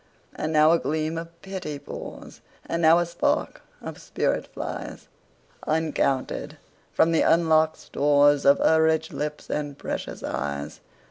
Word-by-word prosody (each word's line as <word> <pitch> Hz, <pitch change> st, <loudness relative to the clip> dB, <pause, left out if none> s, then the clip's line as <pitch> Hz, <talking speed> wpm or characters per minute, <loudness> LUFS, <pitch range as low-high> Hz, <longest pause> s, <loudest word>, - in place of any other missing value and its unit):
And 155 Hz, -, -3 dB
now 155 Hz, 0 st, +5 dB
a 170 Hz, -, +4 dB
gleam 155 Hz, +3 st, -2 dB
of 170 Hz, 0 st, -11 dB
pity 185 Hz, -6 st, -5 dB
pours, -, -, -9 dB, 0.2 s
And 170 Hz, -, -2 dB
now 165 Hz, +1 st, +6 dB
a 175 Hz, -, +2 dB
spark 170 Hz, 0 st, -1 dB, 0.2 s
of -, -, -8 dB
spirit -, -, -1 dB
flies, -, -, -7 dB, 0.6 s
Uncounted, 155 Hz, -4 st, -1 dB, 0.3 s
from 165 Hz, -, +3 dB
the 165 Hz, -, +3 dB
unlock'd 160 Hz, -1 st, +3 dB
storesOf 145 Hz, -1 st, +3 dB
her 160 Hz, 0 st, +4 dB
rich 160 Hz, 0 st, +1 dB
lips 150 Hz, 0 st, -4 dB
and 145 Hz, -2 st, -3 dB
precious -, -, -5 dB
eyes. 70 Hz, 0 st, -4 dB
155 Hz, 135 wpm, -25 LUFS, 145-165 Hz, 0.6 s, now